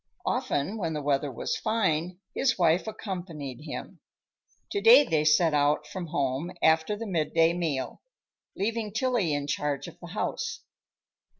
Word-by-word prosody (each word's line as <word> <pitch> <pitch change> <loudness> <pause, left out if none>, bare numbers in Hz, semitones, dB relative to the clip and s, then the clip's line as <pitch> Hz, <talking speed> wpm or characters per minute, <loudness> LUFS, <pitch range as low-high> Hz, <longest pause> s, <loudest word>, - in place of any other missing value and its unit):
Often, 190 +11 -1
when 165 -4 -2
the 150 - -3
weather 140 0 0
was 120 - -3
fine, 180 -5 0 0.2
his 265 -1 +1
wife 175 +2 +3
accompanied 175 - -6
him. 150 - -7 0.7
To 405 - -1
day 455 -7 +9
they 160 - +1
set 155 +1 +4
out 150 +1 +2
from 180 +2 -6
home 145 +1 -1
after 160 +5 +3
the 230 +2 -6
midday 165 -3 +2
meal, 155 -7 -3 0.6
leaving 215 0 -2
Tillie 230 -7 +1
in 145 -1 -1
charge 145 -1 -2
of - - -12
the - - -10
house. - - -3
165 Hz, 145 wpm, -28 LUFS, 150-200 Hz, 0.7 s, day